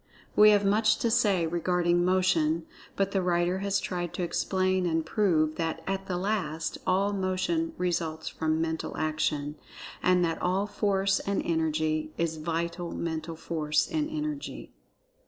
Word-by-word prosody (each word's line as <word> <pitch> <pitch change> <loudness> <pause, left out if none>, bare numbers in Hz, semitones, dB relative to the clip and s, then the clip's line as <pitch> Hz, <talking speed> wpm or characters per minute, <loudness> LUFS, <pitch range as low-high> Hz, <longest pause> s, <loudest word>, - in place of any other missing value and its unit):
We 210 0 +8
have 205 -1 +4
much 215 +2 +3
to 230 - 0
say 195 -6 +3
regarding 175 +1 +1
Motion, 175 -3 +2 0.3
but 195 0 0
the 195 - +1
writer 175 +1 +1
has 200 0 0
tried 175 -2 -4
to 180 - -2
explain 185 +1 0
and 160 -1 0
prove 160 -5 +1
that, 165 -1 -2
at 195 0 -3
the 180 - -1
last, 175 -5 -2
all 195 +2 +2
Motion 200 - -1
results 165 -3 -2
from 160 0 -1
Mental 160 0 -2
Action, 150 -1 -1 0.4
and 180 -1 +3
that 165 -1 -2
all 185 +3 +1
Force 195 -2 +1
and 200 0 -1
Energy 155 -1 0
is 165 -1 -1
Vital 170 +2 -3
Mental 160 0 -4
Force 155 -2 0
and 310 -1 0
Energy. 300 -2 -5
175 Hz, 150 wpm, -28 LUFS, 160-195 Hz, 0.4 s, We